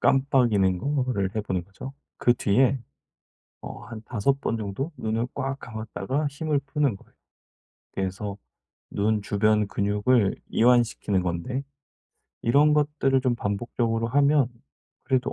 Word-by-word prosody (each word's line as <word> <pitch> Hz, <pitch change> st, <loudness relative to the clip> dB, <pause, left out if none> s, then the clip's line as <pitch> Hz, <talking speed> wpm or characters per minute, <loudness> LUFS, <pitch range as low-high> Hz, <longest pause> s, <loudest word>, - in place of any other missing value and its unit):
깜빡이는 120 Hz, -9 st, +3 dB
거를 125 Hz, -8 st, -1 dB
해 -, -, +2 dB
보는 95 Hz, -4 st, -2 dB
거죠. 100 Hz, +8 st, -9 dB, 0.2 s
그 120 Hz, -, +3 dB
뒤에 130 Hz, +4 st, +2 dB, 0.8 s
어 -, -, -8 dB
한 110 Hz, 0 st, -8 dB
5 135 Hz, +5 st, 0 dB
번 115 Hz, -, -1 dB
정도 110 Hz, -, -4 dB
눈을 110 Hz, +2 st, -1 dB
꽉 135 Hz, 0 st, -3 dB
감았다가 110 Hz, +5 st, -3 dB
힘을 145 Hz, +1 st, -1 dB
푸는 140 Hz, -8 st, 0 dB
거예요. -, -, -23 dB, 0.8 s
그래서 95 Hz, +1 st, -3 dB, 0.5 s
눈 105 Hz, +1 st, 0 dB
주변 105 Hz, +1 st, +2 dB
근육을 105 Hz, +2 st, +2 dB
이완시키는 115 Hz, -5 st, +3 dB
건데 90 Hz, +10 st, -3 dB, 0.8 s
이런 145 Hz, +6 st, +4 dB
것들을 145 Hz, -3 st, +2 dB
좀 125 Hz, -2 st, +2 dB
반복적으로 115 Hz, +1 st, -1 dB
하면 140 Hz, +1 st, +4 dB, 0.6 s
그래도 130 Hz, -2 st, 0 dB
115 Hz, 255 characters per minute, -25 LUFS, 100-135 Hz, 0.8 s, 이런